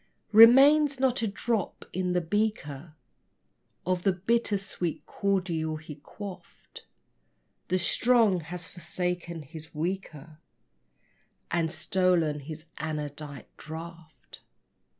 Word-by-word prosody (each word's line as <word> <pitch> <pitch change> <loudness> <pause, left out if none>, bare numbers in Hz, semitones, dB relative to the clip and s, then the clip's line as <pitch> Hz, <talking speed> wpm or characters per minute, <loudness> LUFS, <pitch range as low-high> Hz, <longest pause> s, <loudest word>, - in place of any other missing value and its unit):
Remains 270 +6 +7
not 260 -2 +2
a 225 - +1
drop 210 +1 -2
in 180 -1 -1
the 180 - +2
beaker 170 -6 -2 0.9
Of 180 0 0
the 195 - +3
bitter 210 +3 +1
sweet 185 -4 -4
cordial 175 -6 -1
he 155 0 -8
quaffed: 185 +6 -11 0.8
The 185 - +1
strong 220 +1 +3
has 170 +2 -6
forsaken 175 -1 -4
his 160 +2 -11
weaker 160 -2 -5 1.1
And 165 -2 +1
stolen 175 -5 +1
his 155 +2 -9
anodyne 150 -2 -5
draught. 165 0 -10
175 Hz, 100 wpm, -28 LUFS, 155-200 Hz, 1.1 s, Remains